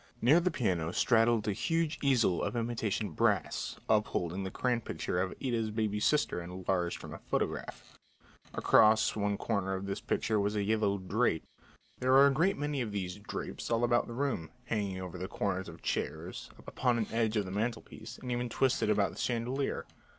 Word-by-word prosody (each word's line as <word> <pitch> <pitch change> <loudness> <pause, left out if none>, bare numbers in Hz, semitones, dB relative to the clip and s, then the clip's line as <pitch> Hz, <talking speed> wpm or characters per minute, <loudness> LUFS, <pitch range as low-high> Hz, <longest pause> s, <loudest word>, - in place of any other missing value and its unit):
Near 140 +9 +6
the 180 +1 +1
piano 95 - 0
straddled 115 +1 +3
a 105 - +2
huge 165 +7 0
easel 125 - +3
of - - -2
imitation 115 -3 -1
brass 105 -6 0
up 105 -1 +3
holding 90 +3 -2
the 95 - -3
crayon 120 +3 0
picture 90 -4 -2
of 95 -1 -2
Ida's 115 -3 0
baby 105 -1 -1
sister 145 -7 +2
enlarged 90 0 -2
from - - -9
a - - -8
photograph. - - -4 0.6
Across 110 0 +5
one 100 -1 0
corner 100 -4 -1
of 95 +1 -4
this 100 0 -3
picture 110 -2 0
was 100 +1 0
a 105 - +1
yellow 105 -1 +1
"drape." 95 -2 0 0.5
There 130 +1 +2
were 135 +1 +8
a 140 - +5
great 165 +8 +2
many 145 -1 -1
of 115 -4 -3
these 95 -2 -3
"drapes" 100 - -6
all 115 0 +1
about 120 0 +3
the 120 - -6
room, 130 - -1 0.2
hanging 100 -5 -2
over 90 -1 -6
the 95 - -3
corners 95 -2 -2
of - - -9
the - - -20
chairs, - - -3 0.2
upon 125 -2 +1
an 110 - 0
edge 115 -1 +1
of 105 - +1
the 95 - -6
mantelpiece, 110 +1 -4
and 125 - -6
even 120 0 -1
twisted 130 -2 +1
about 105 -2 +2
the - - -10
chandelier. 125 +3 -1
110 Hz, 190 wpm, -31 LUFS, 100-120 Hz, 0.6 s, were